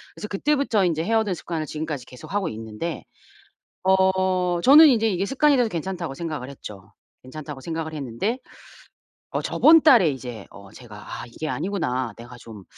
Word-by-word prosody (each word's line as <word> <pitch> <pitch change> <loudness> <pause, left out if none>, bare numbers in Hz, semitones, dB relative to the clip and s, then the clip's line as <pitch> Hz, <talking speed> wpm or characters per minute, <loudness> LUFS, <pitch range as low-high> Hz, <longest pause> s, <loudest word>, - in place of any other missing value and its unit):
그래서 210 - -7
그때부터 235 -3 +1
인제 165 -2 0
해 225 - -1
오던 215 -4 +1
습관을 160 -1 -4
지금까지 150 -4 -5
계속 125 +9 -12
하고 200 -4 0
있는데 110 +9 -6 0.8
어 185 -2 +2
저는 300 - +9
인제 225 -4 +3
이게 190 0 -1
습관이 280 +3 +3
돼서 245 -2 +3
괜찮다고 170 -3 -4
생각을 150 -6 -5
했죠. 105 -6 -11 0.3
괜찮다고 145 +1 -9
생각을 160 0 -5
했는데 145 - -3 0.9
어 - - -2
저번 325 0 +5
달에 235 - +6
이제 125 -6 -7
어 100 0 -14
제가 115 -4 -12 0.3
'아 - - -7
이게 155 +6 -6
아니구나. 130 - -2
내가 120 +1 -11
좀 105 -5 -12
165 Hz, 360 characters per minute, -23 LUFS, 130-200 Hz, 0.9 s, 저는